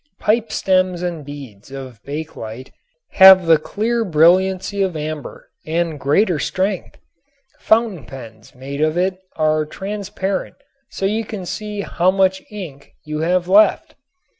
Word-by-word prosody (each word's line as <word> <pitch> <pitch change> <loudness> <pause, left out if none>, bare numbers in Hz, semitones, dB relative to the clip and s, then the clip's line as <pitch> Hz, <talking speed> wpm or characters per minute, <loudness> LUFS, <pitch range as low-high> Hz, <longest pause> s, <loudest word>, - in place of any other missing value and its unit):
Pipestems 185 -5 +1
and 170 -4 -4
beads 135 -8 -11
of 130 -5 -9
bakelite 135 -5 -7 0.4
have 190 -1 +8
the 165 -2 +5
clear 225 +8 -1
brilliancy 185 +3 +2
of 185 -4 -1
amber 155 -1 -7
and 165 -1 -2
greater 160 +5 +2
strength. 190 +3 -2 0.6
Fountain 220 - +1
pens 115 -2 -12
made 140 +3 -6
of 155 +2 +1
it 185 +1 0 0.2
are 155 -1 +1
transparent 195 +2 -4 0.3
so 195 - -4
you 215 +3 0
can 205 -4 -7
see 210 +2 -5
how 180 -2 +1
much 190 0 +2
ink 170 -10 -9
you 150 0 -4
have 175 +2 0
left. 200 +2 +4
175 Hz, 130 wpm, -19 LUFS, 150-195 Hz, 0.6 s, have